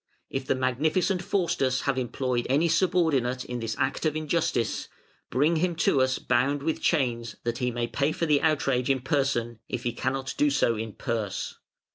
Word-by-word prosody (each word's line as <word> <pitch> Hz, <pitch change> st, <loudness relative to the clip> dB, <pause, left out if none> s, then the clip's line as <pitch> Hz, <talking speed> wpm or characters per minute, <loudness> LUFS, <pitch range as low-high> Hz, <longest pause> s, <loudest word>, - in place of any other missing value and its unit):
If 135 Hz, 0 st, -3 dB
the -, -, +2 dB
Magnificent 155 Hz, +9 st, +1 dB
Faustus 165 Hz, -9 st, 0 dB
have 140 Hz, -, 0 dB
employed 125 Hz, -1 st, -1 dB
any 145 Hz, +6 st, +3 dB
subordinate 160 Hz, -8 st, +2 dB
in 125 Hz, 0 st, -4 dB
this 115 Hz, -1 st, -3 dB
act 135 Hz, 0 st, -1 dB
of 155 Hz, -2 st, +1 dB
injustice, 155 Hz, -6 st, 0 dB, 0.4 s
bring 155 Hz, +5 st, +2 dB
him 175 Hz, +1 st, 0 dB
to 140 Hz, -4 st, +3 dB
us 130 Hz, 0 st, +2 dB
bound 140 Hz, +4 st, +1 dB
with 160 Hz, +1 st, -1 dB
chains 120 Hz, -7 st, 0 dB
that 120 Hz, 0 st, -2 dB
he 125 Hz, -1 st, +1 dB
may 120 Hz, 0 st, -1 dB
pay 140 Hz, +5 st, 0 dB
for 165 Hz, -, -1 dB
the 150 Hz, -3 st, +3 dB
outrage 135 Hz, -5 st, +1 dB
in 135 Hz, -2 st, +2 dB
person, 125 Hz, -4 st, 0 dB
if 125 Hz, -, -3 dB
he 120 Hz, -2 st, -1 dB
cannot 130 Hz, +2 st, -2 dB
do 145 Hz, -, +4 dB
so 140 Hz, -4 st, +2 dB
in 110 Hz, -1 st, -5 dB
purse. 110 Hz, -4 st, -3 dB
135 Hz, 180 wpm, -27 LUFS, 120-155 Hz, 0.4 s, do